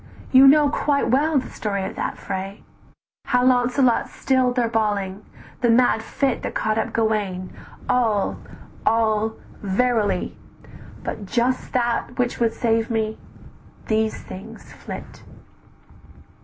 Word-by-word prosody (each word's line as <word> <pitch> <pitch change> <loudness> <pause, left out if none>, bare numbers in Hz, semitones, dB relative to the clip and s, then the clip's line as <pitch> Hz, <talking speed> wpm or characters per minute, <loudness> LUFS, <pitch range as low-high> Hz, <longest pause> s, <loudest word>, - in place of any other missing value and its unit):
You 265 +1 +8
know 295 +1 +6
quite 285 0 0
well 295 +4 +3
the 260 - -2
story 200 -2 -3
of - - -6
that - - -3
fray, 195 +1 -5 0.6
"How 250 0 +2
Launcelot 250 0 +3
still'd 255 -2 +1
their 245 -2 +2
bawling, 205 -3 -1 0.4
the 240 - +3
mad 230 -1 +4
fit 270 +3 -1
That - - -5
caught 220 0 0
up - - -2
Gauwaine, 205 -5 -1 0.3
all, 225 -5 +1 0.5
all, 220 -1 +2 0.3
verily, 210 +1 0 0.7
But 205 - -5
just 245 +4 0
that 240 0 -1
which 245 -1 -1
would 230 -1 +2
save 225 0 0
me; 220 -1 -1 0.7
these 220 0 0
things 185 - -10
flit. - - -9
230 Hz, 125 wpm, -22 LUFS, 215-250 Hz, 0.7 s, You